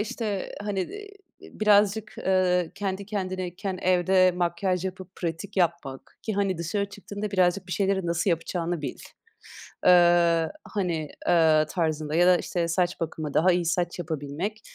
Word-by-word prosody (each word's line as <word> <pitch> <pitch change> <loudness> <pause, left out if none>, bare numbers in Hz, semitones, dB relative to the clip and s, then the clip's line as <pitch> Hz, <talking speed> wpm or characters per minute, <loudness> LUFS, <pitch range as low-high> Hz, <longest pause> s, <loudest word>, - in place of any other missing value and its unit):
işte, 210 -2 -3
hani, 205 -2 -2
iii, 410 - -7 0.5
birazcık, 210 +1 +3
ııı, 180 -2 +2
kendi 195 0 -4
kendineyken 185 -1 -4
evde 185 0 +4
makyaj 180 +1 0
yapıp 185 0 -7
pratik 170 +4 -5
yapmak 170 -7 -2
ki, 220 - -3
hani, 195 -3 0
dışarı 200 +5 -2
çıktığında 205 +1 -6
birazcık 185 -1 +1
bir 180 - -5
şeyleri 195 -2 0
nasıl 170 +3 +1
yapacağını 170 0 -2
bil, 135 - -5 0.9
ııı, 175 -2 +5 0.2
hani, 170 -7 -1 0.2
ııı, 160 -3 +5
tarzında 155 -3 -1
ya 175 +2 +5
da 180 -1 +6
işte, 170 -1 -2
saç 175 +1 0
bakımı, 155 -3 -4
daha 185 +4 +4
iyi 175 -1 +1
saç 175 +1 -1
yapabilmek. 160 +6 -4
180 Hz, 140 wpm, -26 LUFS, 170-195 Hz, 0.9 s, da